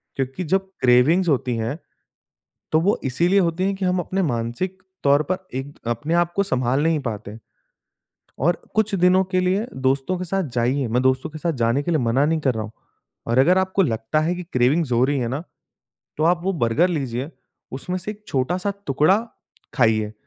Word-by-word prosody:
क्योंकि 135 +6 -3
जब 190 +3 0
क्रेविंग्स 135 +9 +4
होती 125 -4 +1
हैं, 115 +6 -2 1.0
तो 155 - +4
वो 195 +5 +2
इसीलिए 170 +9 +2
होती 170 0 0
हैं 195 0 +1
कि 190 - -3
हम 180 0 +1
अपने 190 +3 -2
मानसिक 140 +8 -2 0.2
तौर 140 +1 +4
पर 185 +5 -1 0.2
एक 135 +2 -6
अपने 120 +8 -1
आप 175 0 +2
को 200 - +3
संभाल 130 -6 0
नहीं 160 -1 +2
पाते। 110 -4 -6 1.0
और 170 +6 +1
कुछ 215 -1 +1
दिनों 185 0 +4
के 185 - +3
लिए 190 +5 0
दोस्तों 135 +7 0
के 185 - -3
साथ 195 +2 -1
जाइए, 125 +3 +1
मैं 120 +3 +1
दोस्तों 130 +4 +1
के 155 - -8
साथ 165 +2 -1
जाने 115 +5 +2
के 160 - -3
लिए 160 - +2
मना 120 +4 +2
नहीं 160 +1 +1
कर 130 -4 +1
रहा 110 - -2
हूँ। 110 - -9 0.5
और 115 +2 +1
अगर 180 +8 +5
आपको 190 +1 +1
लगता 115 +1 0
है 170 +3 0
कि 180 - -6
क्रेविंग्स 130 +3 +2
हो 120 +1 +4
रही 140 +1 +1
है 120 -2 -1
ना, 140 +6 -3 0.7
तो 155 - 0
आप 175 +1 +3
वो 195 - +1
बर्गर 155 +2 +2
लीजिए, 135 -4 -3 0.4
उसमें 180 +8 -3
से 190 +4 -5
एक 210 0 -10
छोटा-सा 180 +10 -1
टुकड़ा 150 +8 +3 0.6
खाइए, 110 -4 +2
150 Hz, 195 wpm, -22 LUFS, 125-180 Hz, 1.0 s, अगर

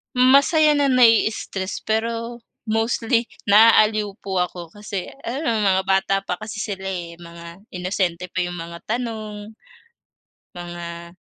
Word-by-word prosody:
Masaya 280 +5 +5
na 285 -1 +3
na-i-stress, 225 -6 +2
pero 230 +2 -2 0.3
mostly 225 +1 0 0.2
naaaliw 215 0 +5
po 190 -2 -2
ako 175 -1 -7
kasi 205 -3 -5 0.2
ano 275 +6 -3 0.2
mga 190 -1 +2
bata 195 0 +2
pa 180 - -3
kasi 215 0 -7
sila, 195 -2 -5
eh, 175 -3 -5
mga 170 +2 -12
inosente 180 -1 -2
pa - - -3
yung 175 0 -5
mga 170 0 -8
tanong, 215 -2 -4 1.0
mga 170 -1 -8
205 Hz, 120 wpm, -22 LUFS, 180-230 Hz, 1.0 s, Masaya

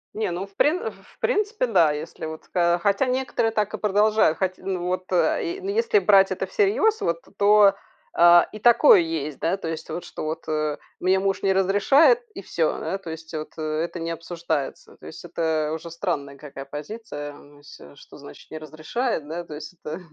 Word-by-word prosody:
Не, 215 -2 -1
ну 180 +3 -4
в 195 0 -22
прин 315 - +1
в - - -19
в - - -23
принципе 420 - 0
да, 175 -10 +4
если 150 +1 -6
вот, 160 0 -8
хо 170 -1 +3
хотя 200 +6 +2
некоторые 250 -3 0
так 210 -1 -1
и - - -2
продолжают, 210 -4 +3
хоть, 185 -1 -1
ну, 185 -2 -3
вот 185 +1 -3
э 180 - +1
и, - - -11
ну 385 - -4
если 455 +2 +2
брать 195 - +5
это - - -2
всерьёз, 435 -1 +1
вот, 170 0 -1 0.2
то 205 -1 +6 0.4
а 175 0 +7
и 215 - -9
такое 240 +1 +6
есть, 155 -3 -3
да, 170 +4 0
то 195 - -6
есть, 160 -1 -5
вот, 175 - -5
что - - -8
вот, 160 +1 -5
э, 155 -1 -1 0.2
мне 185 +1 +2
муж 195 0 -1
не 195 - +2
разрешает 205 - +4
и - - -7
всё, - - -1
да, 195 - -3
то 175 - -9
есть 160 0 -9
вот 155 -1 -6
это 155 +2 -3
не 165 0 -3
обсуждается. 165 -3 -4
То - - -13
есть - - -10
это 160 -2 -1
уже 160 +1 -6
странная 150 -5 -4
какая 140 -1 -9
позиция. 145 -2 -7
Ну 145 0 -17
если, 75 - -14
что - - -15
значит - - -14
"не 155 - -6
разрешает"? 155 - -3
Да, 170 +3 -5
то 155 - -9
есть 150 +3 -9
это. 155 +4 -5
175 Hz, 205 wpm, -24 LUFS, 155-210 Hz, 0.4 s, а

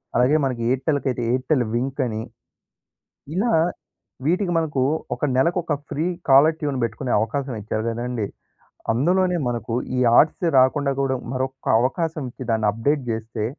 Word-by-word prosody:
అలాగే 125 +5 +4
మనకి 125 -3 -2
ఎయిర్టెల్‌కైతే 130 -1 0
ఎయిర్టెల్ 130 +1 +1
వింకని. 125 -3 -1 1.2
ఇలా 230 +5 +1 0.7
వీటికి 180 +3 +1
మనకు 150 -5 0 0.3
ఒక - - -25
నెలకొక 170 +4 +1 0.2
ఫ్రీ 155 +4 -1 0.2
కాలర్‌టూన్ 145 0 +4
పెట్టుకునే 125 +2 -2
అవకాశం 130 +4 -2
ఇచ్చారు 110 +1 -3
కదండీ! 120 -1 -2 0.7
అందులోనే 180 +8 +2
మనకు 120 -1 -4 0.2
ఈ - - +2 0.2
ఆర్ట్స్ 160 +3 +3
రాకుండా 140 +2 +3
గూడా 135 -1 0 0.2
మరొక్క 130 0 -4 0.2
అవకాశం 160 +4 -1
ఇచ్చి 130 - -8
దాన్ని 110 -1 +1
అప్‌డేట్ 140 +7 0
జేస్తే 110 -1 -3
130 Hz, 125 wpm, -22 LUFS, 120-155 Hz, 1.2 s, అలాగే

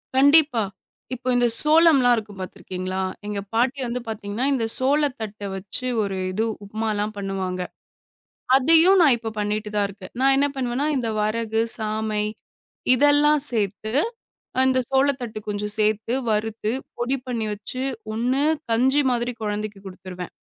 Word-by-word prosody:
கண்டிப்பா. 285 -3 +5 0.5
இப்போ 255 0 -7
இந்த 245 0 +3
சோளம்லாம் 305 -5 +5
இருக்கும் 210 -3 -6
பாத்துருக்கீங்களா? 185 0 -5 0.3
எங்க 210 -1 -3
பாட்டி 245 +4 +1
வந்து 240 +1 -3
பாத்தீங்கன்னா 220 +2 -3
இந்த 240 -4 0
சோளத்தட்ட 260 -7 0
வச்சு 195 +6 -4 0.2
ஒரு 195 -1 -3
இது 220 +4 0 0.2
உப்புமாலாம் 215 0 -2
பண்ணுவாங்க. 190 -2 -3 1.0
அதையும் 330 +7 +5
நான் 285 -6 +6
இப்ப 225 -1 -5
பண்ணிட்டு 210 +1 -2
தான் 205 -1 +2
இருக்கேன். 195 -1 -12
நான் 270 +1 +5
என்ன 280 +1 +3
பண்ணுவேன்னா 255 +2 -1
இந்த 245 -3 -1
வரகு, 220 +1 -1 0.2
சாமை 215 -1 -1 0.7
இதெல்லாம் 290 +2 +4
சேர்த்து 215 -2 -2 0.7
அந்த 260 0 +3
சோளத்தட்டை 265 -5 0
கொஞ்சம் 210 0 -2
சேர்த்து 215 +2 +1 0.2
வறுத்து 215 0 -1 0.3
பொடி 245 +3 0
பண்ணி 235 -3 -2
வச்சு, 210 +5 -6 0.3
ஒண்ணு 250 +5 0 0.3
கஞ்சி 260 +5 +3
மாதிரி 240 0 -1
குழந்தைக்கு 210 -1 -3
கொடுத்துருவேன். 185 -1 -8
225 Hz, 130 wpm, -23 LUFS, 210-260 Hz, 1.0 s, நான்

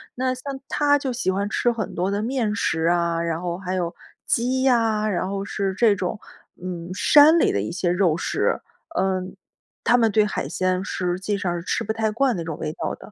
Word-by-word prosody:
那 255 +1 0
像 270 +1 -6
他 290 -1 +3
就 270 -3 -3
喜 235 -5 -1
欢 195 +2 0
吃 240 +3 +1
很 225 -3 -4
多 180 +2 -1
的 200 +1 -1
面 230 -3 -1
食 160 -5 0
啊， 170 -1 +1
然 165 -1 -1
后 175 0 -3
还 185 -1 -3
有 175 -2 -2 0.3
鸡 255 +2 +1
呀， 225 -4 +2
然 185 -2 -1
后 195 0 -3
是 195 -2 -2
这 215 -1 +4
种， 190 +2 -3 0.4
嗯， 175 -1 -6
山 295 - +7
里 - - +3
的 100 - 0
一 105 - -4
些 175 0 0
肉 175 -3 +2
食。 - - 0 0.4
嗯， 185 -1 -1 0.5
他 245 - +4
们 230 -2 +3
对 215 0 +3
海 210 - -3
鲜， 185 0 0
实 180 -1 -2
际 205 +2 -1
上 180 -3 -1
是 - - -7
吃 - - 0
不 220 - -2
太 220 0 0
惯 255 +4 +2
那 165 - -4
种 160 -2 -5
味 155 - -3
道 - - -4
的。 - - -14
200 Hz, 235 characters per minute, -23 LUFS, 180-235 Hz, 0.5 s, 山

